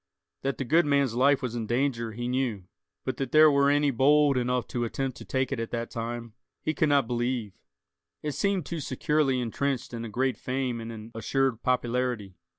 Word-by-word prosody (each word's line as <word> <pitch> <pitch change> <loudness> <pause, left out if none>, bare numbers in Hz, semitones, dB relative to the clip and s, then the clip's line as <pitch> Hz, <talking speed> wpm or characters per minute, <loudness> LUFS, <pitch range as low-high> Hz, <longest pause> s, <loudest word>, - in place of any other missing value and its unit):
That 135 +1 -2
the - - -2
good 160 +4 +3
man's 140 -4 +2
life 135 +3 +3
was 125 -2 -2
in 115 -2 -3
danger, 120 -2 0
he 120 +2 -4
knew; 125 -6 -1 0.4
but 130 - -2
that 135 -2 -3
there 155 0 +7
were 140 0 +4
any 145 0 +3
bold 145 +3 +4
enough 125 -1 0
to 120 - -2
attempt 130 +2 -2
to - - -10
take 130 0 -1
it 140 - -2
at 115 - -3
that 115 0 -4
time, 115 0 -5 0.3
he 155 - 0
could 155 - +1
not 140 -2 +4
believe. 120 -3 -2 0.7
It 150 - -1
seemed 185 +4 0
too 170 +1 -4
securely 140 -1 +1
intrenched 125 +2 -2
in 115 -1 -4
a 115 - -5
great 130 +1 0
fame 130 -2 -2
and 115 0 -6
an 110 0 -9
assured 115 +2 0
popularity. 125 -5 0
125 Hz, 200 wpm, -27 LUFS, 115-140 Hz, 0.7 s, there